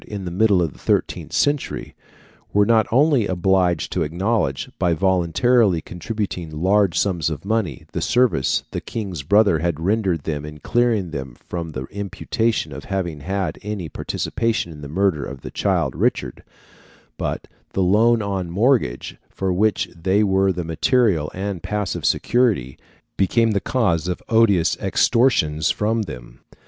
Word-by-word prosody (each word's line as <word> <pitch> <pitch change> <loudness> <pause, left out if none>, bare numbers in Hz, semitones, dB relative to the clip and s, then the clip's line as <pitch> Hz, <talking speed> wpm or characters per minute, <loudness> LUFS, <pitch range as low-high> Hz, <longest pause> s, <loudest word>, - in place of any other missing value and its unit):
in 100 -3 -6
the 90 - -4
middle 100 -1 +3
of 80 -5 -3
the - - -18
thirteenth - - -1
century, 145 -1 -1 0.6
were 105 0 +4
not 110 -1 +3
only 135 -3 +3
obliged 90 -2 +1
to 90 - -1
acknowledge, 85 -2 -1
by 85 -2 +2
voluntarily 95 +4 +2
contributing 90 -1 -5
large 90 +3 +2
sums 85 -6 +1
of 80 +2 -6
money, 100 - -1
the - - -3
service 120 - +2
the - - -4
King's 95 -9 -5
brother 100 +2 +3
had 85 -2 -1
rendered 95 -3 0
them 75 -2 -3
in 75 0 -8
clearing 110 0 0
them 65 -4 -6
from 85 +3 -6
the 65 - -4
imputation 100 -3 -2
of 70 - -8
having 90 -6 -3
had 95 +5 -3
any 105 -5 -4
participation 115 -2 -2
in 75 -2 -11
the 70 - -7
murder 85 -1 0
of 70 -2 -7
the - - -8
child - - 0
Richard, - - -1 0.8
but - - -3 0.3
the 95 - +1
loan 110 +5 +3
on 95 -3 -3
mortgage, 110 - +1
for 95 -1 -2
which 105 +3 +1
they 95 +5 +1
were 95 -1 +2
the 90 -1 -3
material 85 - +1
and 95 -2 -4
passive 95 -4 -3
security, 110 - +1 0.4
became 115 +4 +2
the 100 - +1
cause 90 -7 0
of 90 - -2
odious 100 -8 +3
extortions 80 - +2
from 110 +2 0
them. 60 - -9
95 Hz, 155 wpm, -21 LUFS, 80-110 Hz, 0.8 s, were